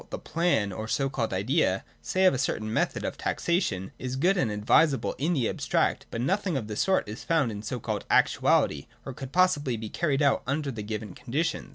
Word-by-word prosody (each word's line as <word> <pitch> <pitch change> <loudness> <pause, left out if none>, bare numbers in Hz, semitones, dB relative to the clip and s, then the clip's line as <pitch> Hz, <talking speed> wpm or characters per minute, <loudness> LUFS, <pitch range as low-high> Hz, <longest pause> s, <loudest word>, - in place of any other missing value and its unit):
the - - -4
plan, 165 - 0
or 110 +3 -5
so 135 +4 0
called 125 -4 -2
idea, 100 - +1 0.2
say 190 0 +1
of 185 - +6
a - - 0
certain 110 -4 -1
method - - 0
of - - -4
taxation, 135 - -1
is 130 0 -4
good 180 +9 +3
and 135 - +1
advisable 125 +8 +2
in 160 +6 +1
the 130 -8 +1
abstract, - - 0
but 115 - -5
that - - 0
no 190 - +3
thing 190 -7 -2
of 110 -5 -4
the 105 - -5
sort 190 - +1
is 105 +3 -7
found 155 -8 +1
in 105 -1 -6
so 110 +4 -4
called 110 -2 -3
actuality, 70 -2 +3 0.2
or 135 - -5
could 135 0 -8
possibly 155 -8 +2
be 110 -1 -6
carried 150 -1 0
out 140 - +3
under 140 +1 -1
the 115 -4 -6
given 105 -2 -5
conditions. 150 - -2
130 Hz, 220 wpm, -27 LUFS, 110-160 Hz, 0.2 s, of